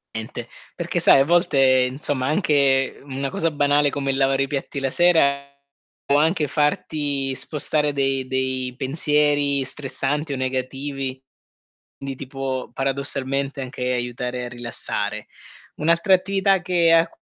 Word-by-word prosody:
Niente, 110 0 -6 0.3
perché - - -2
sai - - +6
a 135 - +4
volte, 135 -6 +4
insomma, 135 -1 -2
anche 140 -4 +2
una 135 0 -4
cosa 165 +4 -1
banale 145 0 +2
come 135 -1 -1
lavare 135 0 +2
i - - -3
piatti 140 0 -4
la 135 -1 -1
sera 140 -4 +3 0.6
può 140 - +2
anche 160 0 +2
farti 145 -2 -1
spostare 150 0 -1
de 135 -1 0
dei 130 -1 -2
pensieri 145 0 +1
stressanti 145 +2 -3
o - - -2
negativi, 130 +1 -3 0.8
quindi 135 -1 -5
ti 140 - -8
può 135 -1 -4
paradossalmente 135 0 -2
anche 125 -1 -3
aiutare 125 0 -3
a - - -6
rilassare. 105 -3 -4 0.5
Un'altra 170 +5 +3
attività 195 0 +1
che 175 -2 +3
a 165 0 +5
cu - - -25
140 Hz, 135 wpm, -22 LUFS, 130-150 Hz, 0.8 s, sai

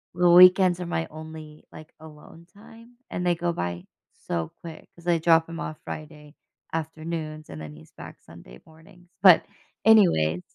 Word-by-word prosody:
the 175 0 +3
weekends 180 0 +6
are - - -4
my 80 - -3
only, 155 -1 -11
like, 155 0 -14
alone 160 +2 -15
time, 230 +3 -17
and 180 - -4
they 175 -1 +2
go 170 0 -2
by 85 - -5 0.4
so 80 -2 -3
quick 165 -2 -11
'cause 170 0 -16
I 170 -1 +2
drop 165 0 +3
him 165 0 -8
off 155 - -7
Friday 150 -1 -10 0.4
afternoons, 160 -1 -6
and 80 -1 -9
then 75 -1 -9
he's 75 +1 -17
back - - -12
Sunday - - -15
mornings. 175 +3 -20
But, 185 -4 +6 0.4
anyways 130 - +4
160 Hz, 165 wpm, -24 LUFS, 150-175 Hz, 0.4 s, weekends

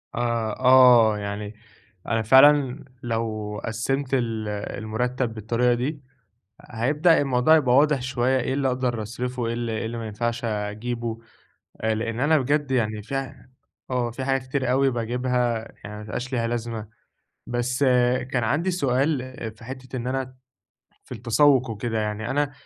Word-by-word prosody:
آه، 115 -2 -1
آه، 125 -4 +6
يعني 105 0 -5 0.5
أنا 115 -1 +1
فعلًا 135 +3 +5 0.2
لو 110 -3 -3
قسّمت 130 +5 -2
ال 115 -4 -1 0.3
المرتب 125 +2 -2
بالطريقة 115 +3 +1
دي، 140 +5 -3 0.6
هيبدأ 150 +9 +2
الموضوع 135 +2 +4
يبقى 130 -6 +3
واضح 145 -1 +4
شوية، 130 0 +1
إيه 130 - -1
اللي 135 0 0
أقدر 125 -3 -1
أصرفه 125 +3 -4
وإيه 115 0 -1 0.2
إيه 110 0 -2
اللي 115 +1 -4
ما 115 -1 -5
ينفعش 120 +2 -3
أجيبه. 115 +2 -3 0.6
آآ، 110 0 +1
لأن 115 +1 -3
أنا 150 +4 +4
بجد 145 +1 0
يعني 110 -4 0
في 135 +3 -4 0.6
آه، 125 -2 0
في 130 +3 -5
حاجة 135 0 +1
كتير 130 -1 -2
أوي 135 +1 +3
باجيبها 120 0 -1 0.2
يعني 105 +1 -7
ما - - -8
بيبقاش 125 +5 -5
ليها 115 -2 0
لازمة. 115 -2 -4 0.6
بس 120 +2 -2 0.5
كان 125 -3 0
عندي 155 +11 +1
سؤال 140 -3 +1 0.4
في 115 - -14
حتّة 130 +1 -8
إن 120 -1 -4
أنا 130 0 -3 0.7
في - - -11
التسوق 125 +2 +3
وكده، 110 +1 -3
يعني 105 +2 -3
أنا 145 +1 0
125 Hz, 150 wpm, -24 LUFS, 115-130 Hz, 0.7 s, آه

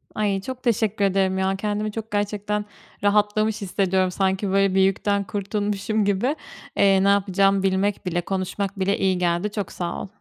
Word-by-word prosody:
Ay, 200 -2 0
çok 255 +4 -7
teşekkür 220 -4 +1
ederim 190 -1 +1
ya, 190 0 +1
kendimi 210 +1 -2
çok 225 +1 -6
gerçekten 205 0 -1 0.4
rahatlamış 210 +1 +2
hissediyorum, 190 -1 +1
sanki 190 +1 0
böyle 195 0 +2
bir 190 - +4
yükten 200 +1 +1
kurtulmuşum 205 +1 -1
gibi. 205 +9 +1 0.4
Iıı, 195 -1 +4
ne 200 - +4
yapacağımı 195 0 +3
bilmek 195 +1 0
bile, 175 -1 0
konuşmak 195 +2 -3
bile 195 +1 +1
iyi 190 -1 +1
geldi, 175 +3 0
çok 205 -3 -4
sağ 175 -1 -4
ol. - - -6
200 Hz, 165 wpm, -23 LUFS, 190-210 Hz, 0.4 s, bir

